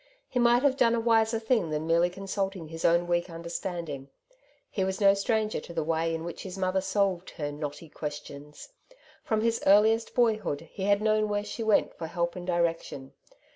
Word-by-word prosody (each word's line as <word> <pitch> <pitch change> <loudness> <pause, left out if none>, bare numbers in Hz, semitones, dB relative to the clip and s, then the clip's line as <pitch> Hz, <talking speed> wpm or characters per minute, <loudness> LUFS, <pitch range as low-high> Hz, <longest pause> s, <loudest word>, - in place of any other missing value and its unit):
He 250 - -2
might 240 +1 +4
have 275 -2 +3
done 235 -2 +4
a - - 0
wiser 225 -1 +3
thing 220 -6 +1
than 155 0 -2
merely 170 +2 +3
consulting 195 -2 -4
his 165 0 -7
own 170 +1 +4
weak 175 +1 0
understanding. 170 -4 -5 0.6
He 195 - -2
was 190 0 -2
no 200 -1 +6
stranger 215 +2 0
to 170 - -10
the 165 -2 -1
way 165 +1 0
in 160 - -5
which 170 0 -6
his 190 0 -7
mother 190 0 0
solved 190 -2 0
her 145 -3 -3
'^ - - -9
knotty 150 +2 -6
questions.^' 150 -1 -8 0.5
From 220 -1 0
his 230 0 +1
earliest 220 +3 +4
boyhood 215 - +1
he 190 - -4
had 205 +1 +3
known 215 -1 +2
where 205 0 0
she 210 +2 -6
went 220 -2 +2
for 165 - -6
help 170 0 -2
and 180 0 -7
direction. 165 -6 -1
190 Hz, 195 wpm, -28 LUFS, 165-215 Hz, 0.6 s, no